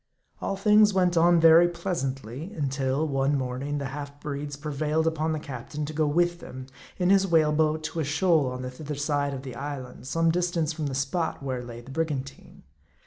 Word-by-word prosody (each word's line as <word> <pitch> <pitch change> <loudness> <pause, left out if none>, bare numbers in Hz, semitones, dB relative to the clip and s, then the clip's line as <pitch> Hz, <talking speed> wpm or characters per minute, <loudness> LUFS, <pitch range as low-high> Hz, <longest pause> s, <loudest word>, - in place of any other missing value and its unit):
All 195 - -1
things 210 0 +5
went 180 -2 +3
on 170 +1 +5
very 165 +1 +7
pleasantly 155 - -4
until, 135 0 -1
one 135 0 +1
morning, 130 +3 -3
the 140 -2 -3
half 145 0 -7
breeds 145 0 -5
prevailed 150 +2 -1
upon 160 0 0
the 155 - -1
captain 145 +1 -6
to 155 - -6
go 155 0 +1
with 175 +3 +1
them, 130 -4 -9 0.3
in 180 0 +2
his 195 0 +4
whale 160 -3 +4
boat, 155 0 +1
to 160 +2 -4
a - - +1
shoal 160 0 +2
on 130 0 -5
the 125 - -5
thither 150 +3 -6
side 145 -1 -1
of 130 - -7
the 130 -2 -7
island, 135 -1 -7
some 165 +3 +2
distance 170 -2 0
from 155 -2 -3
the 135 - -3
spot 140 +3 -2
where 130 -2 -3
lay 120 -1 -8
the 130 - -12
brigantine. 140 -3 -4
150 Hz, 195 wpm, -26 LUFS, 135-165 Hz, 0.3 s, very